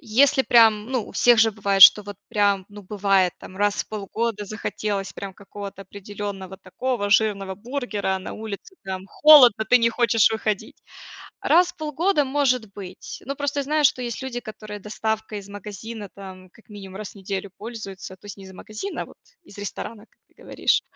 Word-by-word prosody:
Если 265 +5 +3
прям, 220 -3 +5
ну, 245 -5 -1
у - - -12
всех 240 -2 +4
же 225 0 +5
бывает, 200 -2 +2
что 210 - +10
вот 205 0 -7
прям, 205 -3 +1
ну, 205 -1 -12
бывает 195 -2 +1
там 185 - -12
раз 205 +1 +1
в - - -28
полгода 215 +1 -3
захотелось 205 -1 -4
прям 195 -1 -8
какого-то 200 0 -9
определенного 195 -1 -7
такого 205 +2 -3
жирного 200 -3 +2
бургера, 230 -4 -3
а - - -2
на 185 - -7
улице 220 - -8
там 190 0 -5
холодно, 255 -8 +7
ты 250 - +7
не 230 0 +3
хочешь 230 -2 +3
выходить. 215 -2 -3 0.6
Раз 355 +1 +4
в - - -39
полгода 310 +1 0
может 255 -6 0
быть. 185 -2 -9
Ну, 275 - -3
просто 285 0 -2
я - - -3
знаю, 300 +1 +1
что 255 -2 +3
есть 240 +1 -5
люди, 250 -2 -4
которые 215 -2 -8
доставкой 220 +1 -3
из 200 - -14
магазина 205 +1 -8
там 185 -2 -11
как 225 - -23
минимум 195 -3 -10
раз 210 0 -7
в - - -24
неделю 195 0 -5
пользуются, 200 -4 -8
то 195 - -17
есть 205 - -8
не 195 - -12
из 190 - -12
магазина, 215 - -6
а - - -8
вот - - -17 0.3
из 205 - -16
ресторана, 210 +2 -7
как - - -39
ты - - -34
говоришь. - - +1
210 Hz, 190 wpm, -23 LUFS, 195-235 Hz, 0.6 s, что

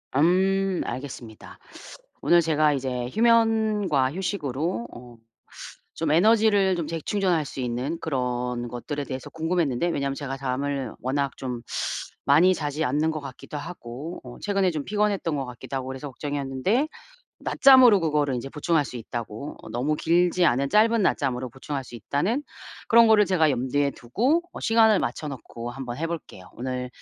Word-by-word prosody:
음 190 +4 +2
알겠습니다. 125 -5 -8 0.6
오늘 175 - +5
제가 155 -2 +2
이제 125 -2 -3
휴면과 220 - +2
휴식으로 155 - -2
어 120 0 -12 0.8
좀 160 -2 -1
에너지를 205 +1 +4
좀 170 -3 -3
재충전할 165 -1 0
수 135 - -8
있는 125 +6 -2
그런 125 -4 -2
것들에 140 +5 -5
대해서 130 -2 -6
궁금했는데 160 -2 0
왜냐면 140 -4 -1
제가 135 -1 -5
잠을 135 -1 -2
워낙 135 +1 -1
좀 125 -3 -5 0.6
많이 175 +7 +5
자지 150 0 -2
않는 150 +5 +1
것 155 - -4
같기도 140 +2 -8
하고 145 +1 -7
어 125 -1 -11
최근에 195 -3 +1
좀 150 -3 -4
피곤했던거 195 -9 0
같기도 125 +2 -8
하고 130 0 -5
그래서 130 +2 -6
걱정이었는데 145 - -1 0.5
낮잠으로 260 -6 +6
그거를 150 -5 0
인제 130 +3 -5
보충할 155 0 +1
수 125 - -7
있다고 115 +3 -6
어 - - -11
너무 135 +7 -1
길지 175 +2 +2
않은 135 -1 +2
짧은 225 +1 +4
낮잠으로 130 -7 0
보충할 135 +2 -5
수 120 -1 -10
있다는 200 - -1 0.4
그런 230 -1 +6
거를 210 -1 +6
제가 160 -5 +3
염두에 140 +2 0
두고 245 - 0
어 - - -8
시간을 225 -3 +4
맞춰놓고 120 -5 -5
한번 125 -2 -6
해볼게요. 165 - -5
오늘 125 0 -4
145 Hz, 345 characters per minute, -25 LUFS, 130-185 Hz, 0.8 s, 낮잠으로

